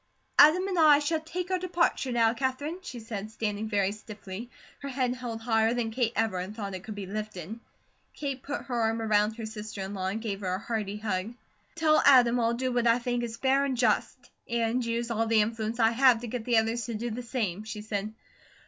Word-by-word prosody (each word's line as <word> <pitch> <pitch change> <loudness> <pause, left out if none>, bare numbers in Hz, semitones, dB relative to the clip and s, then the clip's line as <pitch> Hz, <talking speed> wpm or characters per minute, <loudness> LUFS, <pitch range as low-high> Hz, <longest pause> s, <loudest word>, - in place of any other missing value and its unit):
"Adam 345 +6 +7
and 370 -3 -1
I 305 -2 +8
shall 305 +2 0
take 355 +3 -5
our 370 - +1
departure 345 -7 0
now, 230 -2 +3
Katherine," 275 +7 -2
she 250 -9 -7
said, 215 -2 -6
standing 215 -1 -3
very 200 -2 +1
stiffly, 210 +1 -8 0.3
her 280 - -6
head 255 -2 0
held 240 -3 -6
higher 225 0 +2
than 230 -2 -1
Kate 230 0 0
ever 215 -5 0
had 190 +4 -7
thought 200 -3 -5
it 185 0 -6
could 215 0 -7
be 200 -1 -5
lifted. 210 0 -6 0.6
Kate 275 -3 -4
put 285 +2 -4
her 240 -3 -2
arm 225 0 +1
around 215 -1 +2
her 225 - -5
sister 215 -2 -7
in 190 +1 -5
law 190 -2 -3
and 200 +4 -2
gave 210 -3 -4
her 185 -2 -1
a - - -2
hearty 210 -1 -3
hug: 210 +1 -3 0.4
"Tell 310 -2 +4
Adam 245 -3 +6
I'll 230 0 +1
do 255 +1 -1
what 240 -1 +1
I 230 +1 +5
think 245 0 -2
is 230 -1 -5
fair 270 +1 +2
and 270 -3 -1
just; 250 +2 +1 0.3
and 235 +1 0
use 235 0 -2
all 225 0 0
the 220 -1 +4
influence 225 +1 -2
I 225 -1 +5
have 245 -1 +5
to 240 - -5
get 235 -1 -4
the 240 -2 +3
others 225 +1 +1
to 235 - -4
do 235 +2 -3
the 235 +3 -4
same," 215 -6 -3
she 215 -1 -7
said. 210 -1 -3
230 Hz, 225 wpm, -28 LUFS, 215-250 Hz, 0.6 s, I